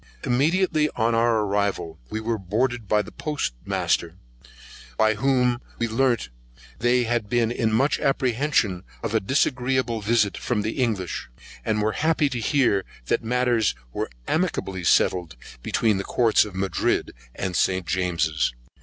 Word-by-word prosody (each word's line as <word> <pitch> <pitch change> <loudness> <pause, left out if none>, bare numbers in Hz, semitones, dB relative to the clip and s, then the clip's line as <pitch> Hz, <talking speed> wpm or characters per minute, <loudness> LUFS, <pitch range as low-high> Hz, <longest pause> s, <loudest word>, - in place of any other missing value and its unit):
Immediately 155 +4 +2
on 115 0 +1
our 115 -1 +3
arrival 100 -5 -1
we 110 - -3
were 110 0 -2
boarded 115 +4 -1
by 105 +1 +2
the - - -11
Port 145 - -2 0.2
master, - - 0 0.8
by 110 0 +4
whom 125 +1 +1 0.2
we 115 - 0
learnt 120 - +1 0.5
they 120 +1 +3
had 120 -3 -1
been 120 -1 +2
in 115 -2 0
much 130 +7 +2
apprehension 125 -7 +1 0.2
of - - -2
a 110 - +4
disagreeable 125 0 0
visit 105 -1 +2
from 105 -4 -1
the 110 +5 -2
English, 100 - -2 0.3
but 110 -1 0
were 105 0 +1
happy 155 +2 +1
to 125 -3 -3
hear 115 -5 +2 0.3
that - - +1
matters 120 - +1 0.2
were - - -3 0.2
amicably 95 -2 -1
settled 85 -2 +2 0.3
between 110 - +1
the 100 - -2
Courts 115 -1 +3
of 105 -3 -9
Madrid 95 0 0 0.2
and 95 -1 -3
St. 95 0 +1
James's. 85 -5 0
115 Hz, 145 wpm, -24 LUFS, 100-125 Hz, 0.8 s, by